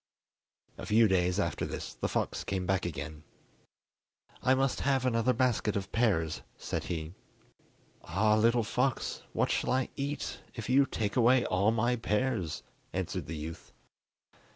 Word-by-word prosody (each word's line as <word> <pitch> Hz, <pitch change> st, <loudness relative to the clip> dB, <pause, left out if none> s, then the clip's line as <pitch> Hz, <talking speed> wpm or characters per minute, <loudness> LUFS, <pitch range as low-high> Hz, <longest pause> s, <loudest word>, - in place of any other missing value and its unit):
A -, -, -5 dB
few 110 Hz, +1 st, +5 dB
days 90 Hz, 0 st, +2 dB
after 85 Hz, -6 st, -1 dB
this -, -, -4 dB
the -, -, -2 dB
fox -, -, -1 dB
came 95 Hz, -2 st, -2 dB
back 95 Hz, -1 st, +1 dB
again. 80 Hz, -2 st, -6 dB, 1.2 s
"I 130 Hz, -, +4 dB
must 135 Hz, 0 st, +1 dB
have 135 Hz, -2 st, +1 dB
another 115 Hz, 0 st, +2 dB
basket 125 Hz, -5 st, +1 dB
of 100 Hz, -1 st, -3 dB
pears," 80 Hz, -10 st, +1 dB, 0.2 s
said -, -, -3 dB
he. 80 Hz, -1 st, -4 dB, 0.9 s
"Ah, 105 Hz, +2 st, +3 dB
little 115 Hz, +2 st, +3 dB
fox, 125 Hz, +4 st, -1 dB
what -, -, +1 dB
shall -, -, 0 dB
I 130 Hz, 0 st, +1 dB
eat 140 Hz, +1 st, -3 dB, 0.2 s
if 115 Hz, -2 st, -6 dB
you 135 Hz, +1 st, +5 dB
take 105 Hz, -2 st, -2 dB
away 125 Hz, +1 st, +5 dB
all 100 Hz, +3 st, +2 dB
my 115 Hz, +2 st, +2 dB
pears?" 105 Hz, -, -1 dB, 0.3 s
answered -, -, -3 dB
the 80 Hz, +1 st, -5 dB
youth. 80 Hz, +2 st, -8 dB
110 Hz, 150 wpm, -31 LUFS, 90-125 Hz, 1.2 s, few